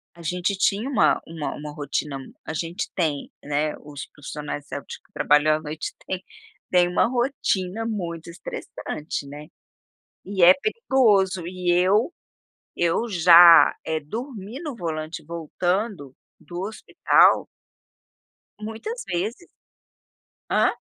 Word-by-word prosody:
a 170 Hz, -, -13 dB
gente 180 Hz, +4 st, -1 dB
tinha 210 Hz, +7 st, +1 dB
uma 240 Hz, -7 st, +3 dB
uma 160 Hz, -2 st, -4 dB
uma 150 Hz, 0 st, -7 dB
rotina 145 Hz, -1 st, -3 dB
m 135 Hz, -, -11 dB
a 160 Hz, -, -5 dB
gente 170 Hz, +4 st, -3 dB
tem, 155 Hz, -6 st, -1 dB
né, 150 Hz, +1 st, -1 dB
os 145 Hz, -2 st, -8 dB
profissionais 145 Hz, 0 st, -7 dB
de -, -, -25 dB
saúde 145 Hz, -, -6 dB
que -, -, -30 dB
trabalham 150 Hz, +1 st, +4 dB
à 155 Hz, -, -9 dB
noite 155 Hz, 0 st, -5 dB
tem 185 Hz, 0 st, -3 dB, 0.5 s
tem 180 Hz, -1 st, +5 dB
uma 180 Hz, -, +2 dB
rotina 225 Hz, -5 st, -1 dB
muito 170 Hz, -7 st, -4 dB
estressante, 170 Hz, -, -6 dB
né. 150 Hz, +2 st, -9 dB, 0.8 s
E 190 Hz, -2 st, 0 dB
é 180 Hz, +2 st, +10 dB
perigoso 240 Hz, -, +2 dB
e 180 Hz, -1 st, -1 dB
eu 195 Hz, -, +3 dB, 0.6 s
eu 175 Hz, +7 st, +1 dB
já, 170 Hz, -2 st, +8 dB
eh, 160 Hz, 0 st, -1 dB
dormir 225 Hz, -, -7 dB
no 295 Hz, -6 st, -5 dB
volante 160 Hz, -4 st, -5 dB
voltando 170 Hz, -, -3 dB, 0.3 s
do 175 Hz, +1 st, -7 dB
hospital 210 Hz, +2 st, +3 dB, 1.1 s
muitas 225 Hz, -, -6 dB
vezes. 215 Hz, -, -3 dB, 1.0 s
Hã? -, -, +3 dB
175 Hz, 125 wpm, -24 LUFS, 155-210 Hz, 1.1 s, é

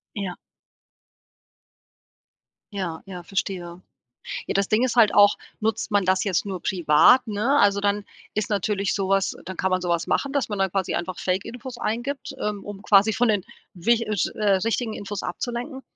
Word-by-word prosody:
Ja. 195 Hz, -4 st, -4 dB, 2.4 s
Ja, 175 Hz, -5 st, -4 dB
ja, 185 Hz, -2 st, -8 dB
verstehe. 180 Hz, -2 st, -4 dB, 0.7 s
Ja, -, -, -2 dB
das 200 Hz, -1 st, +1 dB
Ding 215 Hz, +3 st, +2 dB
ist 255 Hz, -1 st, 0 dB
halt 225 Hz, -3 st, +5 dB
auch, 205 Hz, 0 st, +6 dB, 0.2 s
nutzt 220 Hz, +1 st, -1 dB
man 205 Hz, -3 st, +2 dB
das 190 Hz, 0 st, +2 dB
jetzt 195 Hz, -1 st, 0 dB
nur 190 Hz, -3 st, -5 dB
privat, 175 Hz, +8 st, +5 dB
ne? 220 Hz, +7 st, +1 dB
Also 200 Hz, -3 st, +4 dB
dann 205 Hz, 0 st, 0 dB, 0.3 s
ist 215 Hz, -1 st, -2 dB
natürlich 200 Hz, -1 st, 0 dB
so 195 Hz, -2 st, -1 dB
was 195 Hz, -1 st, +2 dB
äh, -, -, -14 dB
dann 190 Hz, +1 st, -7 dB
kann 190 Hz, -, 0 dB
man 185 Hz, 0 st, +1 dB
so 175 Hz, -, -2 dB
was 170 Hz, -1 st, 0 dB
machen, 275 Hz, -, 0 dB
dass 280 Hz, -2 st, 0 dB
man 205 Hz, -2 st, -3 dB
da 195 Hz, -1 st, +1 dB
quasi 190 Hz, -1 st, -1 dB
einfach 175 Hz, +1 st, -3 dB
Fake 185 Hz, +1 st, -1 dB
Infos 245 Hz, +1 st, -8 dB
eingibt, 240 Hz, +5 st, -3 dB
ähm, 210 Hz, -1 st, -3 dB
um 205 Hz, -1 st, -8 dB
quasi 205 Hz, +2 st, +4 dB
von 245 Hz, +2 st, +2 dB
den 205 Hz, -4 st, +1 dB, 0.3 s
wicht 230 Hz, +6 st, +1 dB
äh, 215 Hz, -, -1 dB
sch 180 Hz, -, +1 dB
äh, 210 Hz, -1 st, +1 dB
richtigen 230 Hz, 0 st, -1 dB
Infos 205 Hz, -1 st, -5 dB
abzulenken. 250 Hz, +3 st, -4 dB
205 Hz, 190 wpm, -24 LUFS, 190-225 Hz, 2.4 s, auch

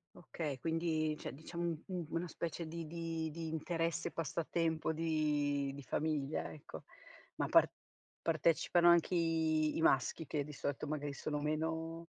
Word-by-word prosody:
Okay, 155 Hz, -5 st, -4 dB
quindi 160 Hz, 0 st, 0 dB
cioè, -, -, -5 dB
diciamo 170 Hz, +4 st, -5 dB
un 165 Hz, -2 st, -1 dB
un 180 Hz, -3 st, -3 dB
una 170 Hz, +1 st, -1 dB
specie 165 Hz, 0 st, -4 dB
di 165 Hz, 0 st, -5 dB
di 165 Hz, -1 st, -3 dB
di 165 Hz, +1 st, -5 dB
interesse, 165 Hz, +1 st, -1 dB
passatempo 160 Hz, +1 st, 0 dB
di 150 Hz, -3 st, +1 dB
di 140 Hz, -, -7 dB
famiglia, 150 Hz, +2 st, -1 dB
ecco. 150 Hz, -, -9 dB, 0.5 s
Ma -, -, 0 dB
par -, -, +7 dB, 0.5 s
partecipano 170 Hz, +1 st, +4 dB
anche 170 Hz, +1 st, +5 dB
i 160 Hz, -2 st, +2 dB
i -, -, 0 dB
maschi, 135 Hz, +2 st, +3 dB
che 145 Hz, -2 st, 0 dB
di 150 Hz, +1 st, -9 dB
solito 140 Hz, +1 st, -2 dB
magari 145 Hz, -1 st, -2 dB
sono 150 Hz, +1 st, -2 dB
meno 160 Hz, +2 st, -1 dB
160 Hz, 150 wpm, -36 LUFS, 150-165 Hz, 0.5 s, par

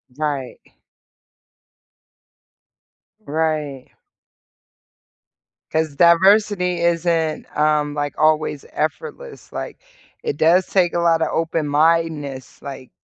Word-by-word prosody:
Right. 145 Hz, -4 st, -3 dB, 2.7 s
Right. 150 Hz, -3 st, -2 dB, 1.8 s
'Cause 155 Hz, -2 st, -1 dB
diversity 180 Hz, +2 st, +4 dB
isn't, 170 Hz, -2 st, 0 dB
um, 150 Hz, -1 st, +2 dB
like, 145 Hz, -1 st, -3 dB
always 155 Hz, -2 st, +1 dB
effortless, 465 Hz, -, -5 dB
like, -, -, -6 dB, 0.5 s
it 450 Hz, -, -3 dB
does 175 Hz, +3 st, +4 dB
take 180 Hz, -3 st, +1 dB
a 170 Hz, -, 0 dB
lotta 165 Hz, -1 st, +2 dB
open-mindedness, 155 Hz, -3 st, 0 dB
like, 135 Hz, -3 st, -8 dB
160 Hz, 80 wpm, -20 LUFS, 150-170 Hz, 2.7 s, diversity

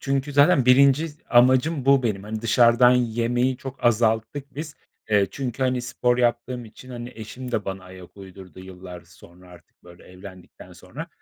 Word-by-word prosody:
çünkü 140 Hz, +1 st, -2 dB
zaten 145 Hz, 0 st, +4 dB
1. 140 Hz, +4 st, +4 dB, 0.2 s
amacım 130 Hz, +4 st, +3 dB
bu 135 Hz, 0 st, +4 dB
benim. 105 Hz, -5 st, -2 dB
Hani, 110 Hz, +1 st, -6 dB
dışarıdan 120 Hz, +2 st, +4 dB
yemeyi 120 Hz, +1 st, 0 dB
çok 135 Hz, 0 st, -10 dB
azalttık 120 Hz, +4 st, 0 dB
biz. 155 Hz, +1 st, -7 dB, 0.4 s
Eee, 100 Hz, -2 st, +3 dB
çünkü, 130 Hz, 0 st, -5 dB
hani, 130 Hz, -1 st, 0 dB
spor 120 Hz, 0 st, -1 dB
yaptığım 120 Hz, 0 st, -1 dB
için, 120 Hz, +3 st, -15 dB
hani, 120 Hz, 0 st, -8 dB
eşim 125 Hz, +3 st, -9 dB
de 110 Hz, -4 st, -2 dB
bana 95 Hz, -1 st, -6 dB
ayak 90 Hz, 0 st, -14 dB
uydurdu 95 Hz, -1 st, -13 dB
yıllar 90 Hz, -1 st, -11 dB
sonra 85 Hz, +1 st, -19 dB
artık 90 Hz, -1 st, -20 dB
böyle 85 Hz, 0 st, -16 dB
evlendikten 95 Hz, 0 st, -14 dB
sonra. -, -, -10 dB
120 Hz, 160 wpm, -23 LUFS, 100-130 Hz, 0.4 s, zaten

